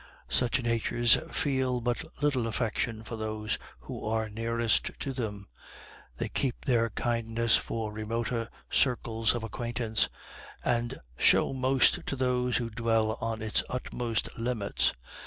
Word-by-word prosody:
Such 125 +1 +1
natures 115 0 +4 0.2
feel 130 -5 +1
but 120 0 -1 0.2
little 130 -6 +2
affection 115 0 -1
for 115 +1 -6
those 110 -1 -2 0.2
who - - -7
are 110 0 0
nearest 115 +1 +1
to 135 - -3
them; 105 -6 -4 0.7
they - - -1
keep 130 -3 -2
their 115 -3 +3
kindness 115 0 +1
for 110 -2 -2
remoter 115 +2 -2 0.2
circles 115 -3 +2
of 120 - -3
acquaintance, 115 -1 0 0.6
and 120 -1 0 0.2
show - - +5
most 130 0 +3
to - - -1
those 125 -2 +1
who 115 -1 -2
dwell 115 -1 +2
on 115 -1 -2
its 110 - +2
utmost 120 -3 -2
limits. 115 -4 0
115 Hz, 130 wpm, -30 LUFS, 110-125 Hz, 0.7 s, show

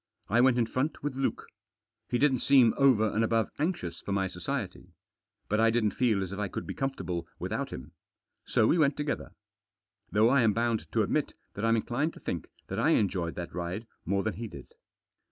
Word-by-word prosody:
I 115 +5 +4
went 130 -1 +4
in 120 - +3
front 130 +7 -2
with 145 -2 -1
Luke. 135 0 -1 0.6
He 120 - +1
didn't 135 -1 +3
seem 130 -5 +5
over 130 -6 +4
and 110 - +2
above 115 -1 +1
anxious 145 - -2
for - - -6
my 95 -1 +1
society. - - -5 0.5
But 105 +2 +1
I 115 0 +5
didn't 110 -2 +2
feel 110 -4 +1
as 95 - -6
if 100 - -5
I 105 - 0
could - - -5
be - - -5
comfortable 90 -11 -3
without - - -3
him. 65 - -8 0.6
So - - +3
we 170 - +3
went 145 -2 +3
together. 150 -1 -3 0.8
Though 110 +2 +4
I 135 +1 +4
am 110 -2 +4
bound 115 0 -1
to - - +3
admit - - -1 0.2
that 105 - -6
I'm 115 0 +4
inclined 130 +8 -1
to - - -11
think - - -4 0.2
that - - -4
I - - +4
enjoyed 90 -5 -1
that 85 -1 -6
ride 90 +6 -4 0.2
more 100 +2 0
than 110 - -1
he 115 +1 -4
did. - - -12
115 Hz, 205 wpm, -29 LUFS, 100-130 Hz, 0.8 s, seem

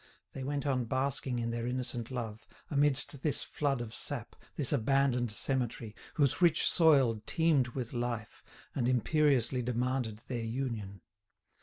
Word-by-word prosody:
They 135 - -5
went 140 +1 -2
on 130 -4 0
basking 130 0 -1
in 115 0 -2
their 115 0 -3
innocent 125 -2 -3
love, 115 -4 -5 0.2
amidst 145 -1 +3
this 150 -2 +1
flood 140 -4 -1
of 115 -2 -6
sap, - - -3 0.2
this 145 0 0
abandoned 125 -2 +2
cemetery, 120 -2 -2 0.2
whose 145 +2 +1
rich 170 -3 +5
soil 135 - +5
teemed 160 -6 +3
with 125 -4 -4
life, 120 -2 -4 0.3
and 125 -2 0
imperiously 130 -1 +2
demanded 125 -2 -2
their 120 -3 -3
union. 110 -5 -4
125 Hz, 140 wpm, -32 LUFS, 115-140 Hz, 0.3 s, rich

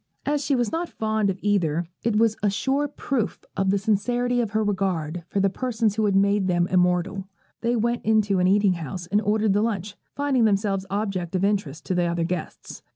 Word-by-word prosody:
As 290 0 0
she 275 0 +1
was 240 -3 0
not 335 +1 -2
fond 220 -2 0
of 190 - -2
either, 175 -5 +1 0.2
it 230 -2 0
was 220 0 +3
a 205 - +2
sure 270 +8 0
proof 260 -5 -3
of 195 0 +1
the 200 - +3
sincerity 245 +4 +1
of 225 - -2
her 215 +1 0
regard 180 -5 -1
for 200 - -2
the 195 - +3
persons 225 0 -1
who 215 0 0
have 200 -2 +2
made 200 0 +3
them 175 -1 +2
immortal. 180 +1 +1 0.3
They 235 +1 +1
went 235 +1 0
into 210 -3 +2
an 180 - +3
eating 200 0 +4
house, 170 +1 -6
and 205 +4 +1
ordered 215 0 +1
the 205 - +2
lunch, 205 -3 -2 0.2
finding 280 -5 +2
themselves 195 -2 0
objects 195 -3 -2
of 185 - 0
interest 195 -7 -1
to - - -1
the 175 -1 +1
other 170 0 -1
guests. 175 -1 -5
205 Hz, 210 wpm, -24 LUFS, 185-220 Hz, 0.3 s, eating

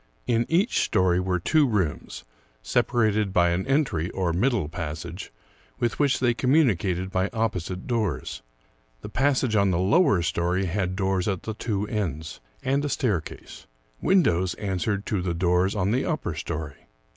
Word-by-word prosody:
In 120 -1 +1
each 190 +9 +2
story 90 -1 +2
were 90 -1 0
two 150 - +3
rooms, 90 - -2 0.4
separated 110 - +1
by 85 -2 +3
an 90 +2 -1
entry, 135 - +1
or 90 -3 -1
middle 105 - +1
passage, 85 +2 -6 0.5
with 120 - -1
which 140 -3 +2
they 120 -2 +2
communicated 105 - +1
by 95 +1 0
opposite 95 -5 -2
doors. 105 - -2 0.6
The - - -7
passage 130 -2 +1
on 100 -2 +3
the 90 - +1
lower 100 - +3
story 90 +3 0
had 95 +1 -1
doors 95 -1 0
at 95 -4 -2
the 110 - -4
two 105 -2 -2
ends, 80 - -3 0.2
and 135 +2 +1
a 145 - -1
staircase. 105 - -3 0.3
Windows 95 - +2
answered 100 +1 -2
to 100 -4 -1
the 90 -2 -2
doors 90 +3 +2
on 100 0 0
the 125 +3 +1
upper 155 - -2
story. 75 -2 -6
95 Hz, 155 wpm, -25 LUFS, 90-120 Hz, 0.6 s, two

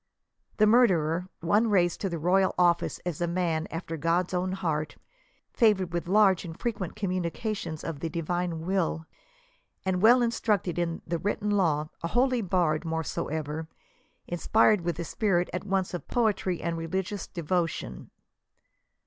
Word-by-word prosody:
The 215 - +5
murderer 180 -7 +3
;— - - -51
one 210 +7 +2
raised 175 -4 +2
to 195 - -1
the 170 - -3
royal 185 +4 +2
office 175 -1 +2
as 175 -2 -3
a 175 - +1
man 170 -2 -1
after 165 0 -5
God's 170 +4 0
own 185 +1 0
heart, 155 -5 -2 0.6
favored 195 -7 +3
with 170 0 -2
large 195 -1 +4
and 165 -3 -8
frequent 205 -7 -3
communications 185 -2 -3
of 160 -4 -5
the 165 - -3
divine 170 0 -2
will, 175 -3 0 0.8
and 185 -1 0
well 240 +3 +6
instructed 210 -7 0
in 170 -1 -2
the 170 0 -2
written 205 +2 -1
law; 155 -7 +1
a 170 - -2
holy 250 +4 +2
bard, 175 -5 +1
moreover, 160 -1 -3 0.6
inspired 210 +3 +3
with 170 -1 -2
the 170 +1 -4
spirit 185 -3 0
at 180 - -3
once 190 -2 -1
of 175 - -5
poetry 210 -6 0
and 165 -1 -2
religious 190 +4 -3
devotion. 170 -1 -3
175 Hz, 150 wpm, -28 LUFS, 165-195 Hz, 0.8 s, well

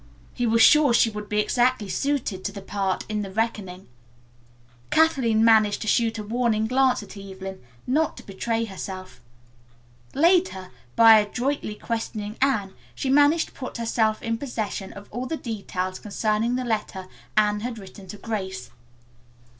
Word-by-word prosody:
He 245 -1 -1
was 230 0 +4
sure 295 -5 +6
she 230 -1 +4
would 210 -1 -7
be 210 - +1
exactly 240 0 +1
suited 240 -6 -2
to 200 - -1
the 200 -1 -9
part 195 -1 -2
in 210 -1 -2
"The 200 - -5
Reckoning." 195 -3 -3 1.0
Kathleen 250 -9 +3
managed 215 -2 +4
to - - -6
shoot 230 +1 +2
a 215 - -4
warning 220 0 0
glance 255 0 +2
at 205 - -12
Evelyn 195 -1 -8 0.2
not 295 +5 0
to - - -11
betray 225 +4 -2
herself. 190 -2 -8 0.9
Later, 330 - +2 0.2
by 225 -1 +8
adroitly 240 +2 -2
questioning 215 -2 -4
Anne, 215 -8 +1 0.2
she 265 - -1
managed 290 +4 +4
to - - -25
put 255 - -7
herself 225 -2 0
in 230 0 -2
possession 215 -7 -4
of 200 0 -11
all 245 +4 -4
the 320 - -3
details 185 -6 -4
concerning 215 +3 -1
the 255 0 -2
letter 210 -4 -3 0.3
Anne 210 -1 +3
had 235 +1 -5
written 195 -1 -12
to 210 - -8
Grace. 190 - -5
220 Hz, 155 wpm, -24 LUFS, 200-245 Hz, 1.0 s, by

